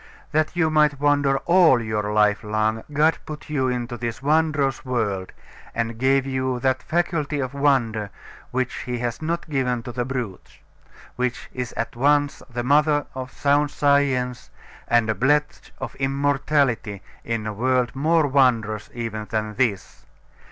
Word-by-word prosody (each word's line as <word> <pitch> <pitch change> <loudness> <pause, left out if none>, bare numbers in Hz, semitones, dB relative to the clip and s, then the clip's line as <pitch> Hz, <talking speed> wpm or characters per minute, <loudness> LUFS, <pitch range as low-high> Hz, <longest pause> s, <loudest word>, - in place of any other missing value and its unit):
That 155 +2 +1
you 160 -2 +2
might 150 -2 +3
wonder 145 -1 +3
all 170 -7 +5
your 105 -2 -2
life 105 0 +3
long, 110 +1 0
God 150 +2 +2
put 155 0 -8
you 135 -3 +1
into 120 -1 -3
this 115 0 -4
wondrous 150 -1 +1
world, 105 -8 -2 0.4
and 115 -1 -2
gave 135 +1 +3
you 130 -1 -1
that 130 0 +1
faculty 160 -4 -1
of 130 0 -3
wonder 120 -7 +1 0.4
which 130 0 -1
he 125 0 -2
has 120 +2 -3
not 170 +2 -2
given 125 -5 -1
to 120 - -6
the 120 0 -2
brutes; 120 -7 -5 0.6
which 125 0 -3
is 125 -1 -4
at 115 - -4
once 145 +3 +2
the 120 0 -3
mother 145 +2 +3
of 130 0 -6
sound 145 +1 +2
science, 135 -4 +1 0.4
and 120 -1 +3
a 110 - +1
pledge 145 +8 0
of - - -6
immortality 135 -5 0 0.2
in 115 -2 -3
a 110 - -3
world 125 +2 0
more 160 +3 +3
wondrous 120 -6 +2
even 110 -2 -4
than 110 -1 -2
this. 100 - -2
130 Hz, 150 wpm, -23 LUFS, 115-145 Hz, 0.6 s, all